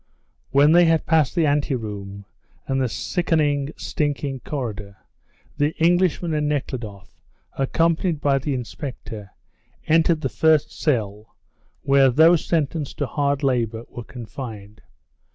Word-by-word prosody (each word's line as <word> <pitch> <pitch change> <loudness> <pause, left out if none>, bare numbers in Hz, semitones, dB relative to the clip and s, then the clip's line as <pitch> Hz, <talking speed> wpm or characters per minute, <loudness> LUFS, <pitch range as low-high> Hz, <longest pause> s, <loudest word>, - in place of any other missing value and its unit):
When 140 +3 +5
they 175 +1 +6
had 165 -1 +2
passed 160 -3 +2
the 170 -3 +3
anteroom 105 -9 -2 0.4
and 135 0 -1
the 130 - 0
sickening, 150 -2 0
stinking 145 -2 -2
corridor, 105 -8 -5 0.6
the 145 +2 0
Englishman 175 0 +2
and 150 -1 0
Nekhludoff, 120 -9 -5 0.3
accompanied 165 +4 0
by 140 -2 +2
the 140 +1 -2
inspector, 115 -4 -7 0.6
entered 165 0 +3
the - - 0
first 160 -2 +2
cell, 110 -6 -2 0.5
where 135 -1 +5
those 160 +5 +5
sentenced 155 -2 -2
to 145 - -1
hard 140 +2 -1
labour 120 -4 0
were 120 - -8
confined. 110 -4 -9
140 Hz, 120 wpm, -22 LUFS, 120-155 Hz, 0.6 s, they